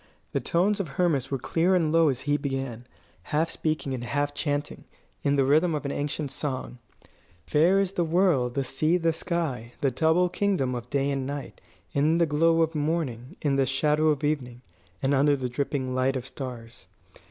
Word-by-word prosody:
The - - -1
tones 195 +5 +1
of 195 - -2
Hermas 150 -3 0
were 135 - -1
clear 170 +8 +1
and 165 -4 +2
low 165 -1 +5
as 130 -2 -2
he 145 0 +1
began, 135 -4 -4 0.3
half 155 - -1
speaking 155 -4 -2
and 125 -2 -4
half 145 +3 -1
chanting, 145 0 -3 0.4
in 140 - +2
the 140 - +3
rhythm 155 +4 +3
of 150 - -4
an 140 - -1
ancient 145 0 -3
song: 130 -3 -4 0.7
"Fair 170 - +4
is 195 -2 0
the 175 - +1
world, 160 -8 +2
the 140 - +1
sea, 155 +6 +1
the 165 -2 +1
sky, 160 -9 -3
the 135 - +2
double 160 +7 +3
kingdom 180 -8 0
of 120 0 -6
day 140 +1 0
and 135 -1 -2
night, 140 -2 -6 0.3
in 150 +4 +3
the 170 - +4
glow 165 +2 +3
of 160 0 -1
morning, 145 -6 -2
in 140 -2 +2
the 135 -1 +2
shadow 150 +4 +2
of 150 -2 +1
evening, 130 -5 -2 0.4
and 135 +1 +2
under 145 +1 +4
the 130 -2 -3
dripping 130 0 -2
light 130 +1 +1
of 125 -1 -3
stars. 125 -4 -8
145 Hz, 190 wpm, -26 LUFS, 130-165 Hz, 0.7 s, low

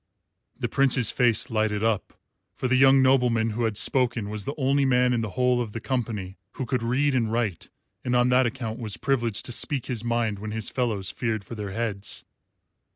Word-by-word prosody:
The - - -2
Prince's 135 -4 +2
face 120 -3 +1
lighted 110 -1 0
up, 110 -3 -1 0.4
for 130 - -2
the 130 - +2
young 135 +1 +6
nobleman 125 -4 +3
who 115 +2 -1
had 110 -2 -1
spoken 120 -6 +1
was 105 -2 -4
the 140 - -4
only 140 0 +2
man 125 -1 +3
in 120 - 0
the 110 - -3
whole 125 -1 +2
of 110 -4 -5
the 115 - -4
company 110 -7 -3
who 130 - -4
could 125 0 -1
read 130 +5 +1
and 115 -4 0
write, 110 -7 -2 0.3
and 125 0 0
on 125 0 +3
that 125 0 +4
account 115 -2 -5
was 110 -4 -3
privileged 120 -5 -1
to - - -3
speak 130 +2 +1
his 120 -4 -4
mind 115 -3 -1
when 110 +1 -6
his 110 -1 0
fellows 110 -7 -1
feared 110 -4 -2
for 110 - -10
their 105 -3 -5
heads. 105 -3 -3
120 Hz, 205 wpm, -25 LUFS, 110-125 Hz, 0.4 s, young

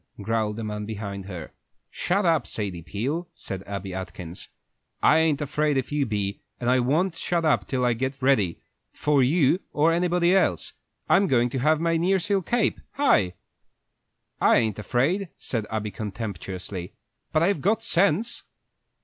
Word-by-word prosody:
growled 110 0 -1
a 115 - -4
man 105 -1 -4
behind 100 -2 -5
her. 90 -5 -7 0.4
"Shut 195 +2 0
up, 160 -6 +2
Sadie 95 -5 -4
Peel," 135 - -3
said 95 -1 -6
Abby 100 -1 -5
Atkins. 90 -2 -7 0.5
"I 155 - +6
ain't 155 -2 +2
afraid 150 0 0
if 130 - -2
you 145 -2 +1
be, 100 -2 -2 0.2
and 120 0 +1
I 130 - +4
won't 160 +8 +1
shut 170 0 -1
up 155 - +2
till 130 -2 0
I 120 - +3
get 130 +4 -3
ready, 120 -11 +2 0.3
for 150 -2 +2
you 145 +5 +3
or 155 +3 +3
anybody 175 +1 +2
else. 195 - +1 0.3
I'm 195 +1 +4
goin' 120 -4 +3
to 130 - -2
have 155 +4 +3
my 165 0 +1
nearseal 190 +3 +1
cape! 235 +6 0
Hi!" 100 - +3 1.0
"I - - +5
ain't 110 -3 0
afraid," 150 - 0
said 110 -4 -3
Abby, 105 -1 -3
contemptuously, 100 -3 -6 0.4
"but 155 - +2
I've 175 -4 +1
got 220 +6 +1
sense." 200 +3 +2
130 Hz, 160 wpm, -25 LUFS, 105-165 Hz, 1.0 s, I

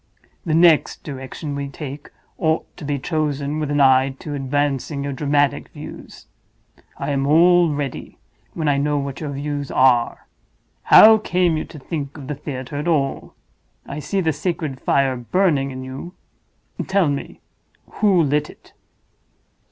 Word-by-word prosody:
The 155 - +2
next 165 -2 +4
direction 140 +1 -6
we 140 0 -3
take 140 0 -8 0.3
ought 160 -1 -1
to - - -10
be 145 0 -1
chosen 145 0 -2
with 150 -2 -2
an 145 0 0
eye 135 0 +4
to 150 - -7
advancing 140 +1 -1
your 140 0 -3
dramatic 145 0 +1
views. - - -11 0.7
I - - -3
am 135 0 0
all 170 +3 +5
ready, 145 -2 -5 0.4
when 160 -2 -2
I 140 -1 +2
know 145 +1 0
what 140 -1 -4
your 150 - -4
views 145 0 -4
are. 125 -2 +2 0.6
How 220 0 +8
came 180 -4 +1
you 155 - -3
to 160 - -12
think 145 0 -5
of 140 - -9
the 150 - -4
theater 135 -1 -6
at 150 +4 -3
all? 140 -5 -1 0.5
I 140 - -6
see 195 +6 -1
the 160 -3 +1
sacred 150 -3 -3
fire 135 -2 +2
burning 140 +2 +1
in 130 -1 -7
you; 135 +8 -8 0.7
tell 190 -3 +2
me, 140 -1 -4 0.6
who 195 -5 +4
lit 150 +1 0
it?" - - -17
145 Hz, 155 wpm, -21 LUFS, 135-160 Hz, 0.7 s, How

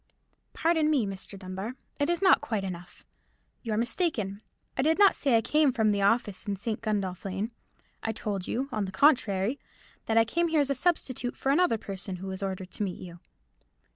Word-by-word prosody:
"Pardon 320 -2 +2
me, 280 -8 +3
Mr. 195 0 -7
Dunbar, 190 +5 -6 0.2
it 285 +2 +1
is 345 +2 0
not 380 - +6
quite 215 -4 -2
enough. 180 -2 -8 0.6
You 225 -3 -3
are - - 0
mistaken: 230 - -1 0.3
I - - +1
did 315 +4 +3
not 400 -1 +6
say 265 -5 +3
I - - +2
came 300 +2 +3
from 220 -4 +2
the 200 -1 0
office 205 -1 +1
in 200 - 0
St. 215 +2 -3
Gundolph 195 -5 -2
Lane. 195 +4 -3 0.5
I 225 - -1
told 205 -4 -3
you, 265 +3 -1
on 215 -4 -1
the 190 - -6
contrary, 215 -1 +3 0.5
that 225 - +2
I 225 - +6
came 340 +9 +1
here 320 -2 +2
as 280 -1 +2
a - - +4
substitute 255 -5 -1
for 270 - +1
another 310 -5 +3
person, 195 -2 -6
who 185 +1 -8
was 190 0 -5
ordered 190 -1 -4
to - - -7
meet 185 -3 -3
you." 175 -1 -10
220 Hz, 200 wpm, -28 LUFS, 195-275 Hz, 0.6 s, not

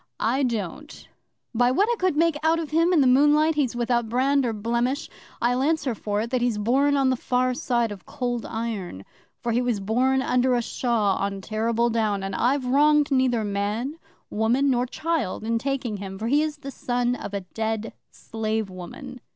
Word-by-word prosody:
"I 245 +6 +1
don't. 240 - -4 0.5
By 245 +1 +3
what 385 +12 +2
I - - +1
could 370 -4 +1
make 330 0 +3
out 320 +1 +3
of 320 -3 -4
him 330 +3 +3
in 335 -5 +4
the - - +4
moonlight, 295 +5 +4
he's 275 -5 0
without 240 -1 0
brand 265 +2 +2
or - - 0
blemish. 235 +6 -1 0.3
I'll 245 +2 +1
answer 285 -3 +1
for 205 -1 -2
it 230 +2 -4
that 255 -2 0
he's 240 -3 +1
born 270 +7 +2
on 270 -1 +3
the - - +1
far 250 +1 0
side 240 -2 0
of 200 -3 -10
Cold 245 -4 -3
Iron, 215 - -5 0.4
for 235 - 0
he 235 +2 +2
was 245 -4 0
born 255 +6 +1
under 250 0 +2
a 240 - +1
shaw 225 -5 0
on 200 0 -2
Terrible 225 +3 0
Down, 215 -3 0
and 195 0 -4
I've 255 +5 +1
wronged 295 +3 +3
neither 255 -4 +2
man, 210 +9 -2 0.3
woman, 240 +6 +2
nor 250 0 +1
child 315 - -2
in 230 +1 0
taking 255 -4 -2
him, 195 -1 -7
for 215 - -5
he 290 +3 +4
is 305 -1 -2
the 275 -1 -8
son 245 -1 -1
of 205 -4 -6
a 200 - -2
dead 220 +3 -4 0.2
slave 220 -2 -3
woman." 250 - -9
245 Hz, 195 wpm, -24 LUFS, 220-275 Hz, 0.5 s, in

